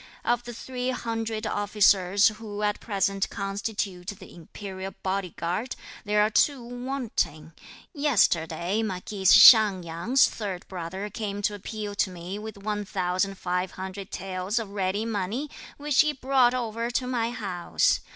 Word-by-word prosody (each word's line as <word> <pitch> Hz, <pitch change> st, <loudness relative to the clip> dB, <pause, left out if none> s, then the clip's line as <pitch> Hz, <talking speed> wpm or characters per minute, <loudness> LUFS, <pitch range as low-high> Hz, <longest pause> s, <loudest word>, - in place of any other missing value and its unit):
Of 240 Hz, 0 st, +1 dB
the 240 Hz, -, -6 dB
three 250 Hz, +1 st, -4 dB
hundred 225 Hz, -3 st, -3 dB
officers 205 Hz, -1 st, +3 dB
who 215 Hz, -1 st, -7 dB
at 205 Hz, 0 st, 0 dB
present 195 Hz, -2 st, 0 dB
constitute 195 Hz, -2 st, -4 dB
the 205 Hz, -, -8 dB
Imperial 190 Hz, +2 st, -8 dB
Body 190 Hz, -1 st, -2 dB
Guard, 180 Hz, +9 st, -2 dB, 0.3 s
there 210 Hz, 0 st, +3 dB
are 215 Hz, -, +1 dB
two 270 Hz, +2 st, +2 dB
wanting. 235 Hz, -, -3 dB, 0.4 s
Yesterday 190 Hz, -, +1 dB
marquis 195 Hz, -1 st, -4 dB
Hsiang 205 Hz, -2 st, +8 dB
Yang's 170 Hz, +11 st, +3 dB
third 195 Hz, -5 st, -5 dB
brother 190 Hz, +3 st, -5 dB
came 205 Hz, -2 st, -4 dB
to 210 Hz, -, +1 dB
appeal 205 Hz, +1 st, -5 dB
to 200 Hz, -, +1 dB
me 180 Hz, +2 st, -6 dB
with 215 Hz, -1 st, -8 dB
one 210 Hz, +1 st, -3 dB
thousand 185 Hz, 0 st, -1 dB
five 180 Hz, +1 st, -2 dB
hundred 190 Hz, +1 st, -7 dB
taels 185 Hz, +3 st, -3 dB
of 220 Hz, -4 st, -2 dB
ready 200 Hz, +2 st, -1 dB
money, 225 Hz, +6 st, -3 dB, 0.3 s
which 290 Hz, -2 st, +3 dB
he 305 Hz, -1 st, +1 dB
brought 260 Hz, -2 st, +3 dB
over 230 Hz, -1 st, -2 dB
to 250 Hz, +1 st, -1 dB
my 240 Hz, -2 st, 0 dB
house. 195 Hz, -7 st, 0 dB
205 Hz, 145 wpm, -26 LUFS, 185-230 Hz, 0.4 s, Hsiang